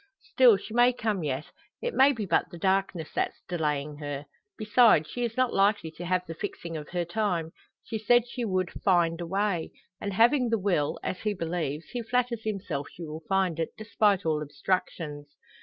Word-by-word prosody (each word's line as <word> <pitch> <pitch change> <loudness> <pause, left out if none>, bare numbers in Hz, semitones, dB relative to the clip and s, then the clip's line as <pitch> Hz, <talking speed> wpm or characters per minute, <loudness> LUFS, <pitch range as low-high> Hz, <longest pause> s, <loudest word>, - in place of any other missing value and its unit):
Still 245 -6 +7
she 215 - -9
may 245 +1 +5
come 215 -7 -1
yet. 140 0 -3 0.3
It 485 0 -3
may 270 +2 +6
be 225 -6 -3
but - - +1
the 175 - -10
darkness 190 -3 0
that's - - -2
delaying 150 -4 -2
her. 145 -1 -5 0.3
Besides, 215 -7 +5
she 245 +9 -4
is 235 0 -3
not 255 -1 +2
likely 195 -4 +2
to 170 +2 -8
have 180 +1 0
the 165 - -6
fixing 165 0 -6
of 150 -1 -6
her 175 -1 -1
time. 175 -4 -1 0.3
She 220 - -4
said 240 +2 +4
she 245 0 -4
would 185 -4 0
"find 175 -3 +3
a 170 - -4
way;" 195 -2 0 0.3
and 200 - -3
having 240 +5 +4
the 225 - +2
will 185 -8 0
as 185 - -3
he 210 -1 -1
believes 165 -3 -3
he 245 - -3
flatters 240 -1 -1
himself 190 -9 -3
she 170 - -9
will 155 +1 -7
find 190 -4 +1
it, 165 - -3
despite 210 -3 +1
all 155 -1 +1
obstructions. 150 -1 -3
185 Hz, 190 wpm, -28 LUFS, 160-220 Hz, 0.3 s, Still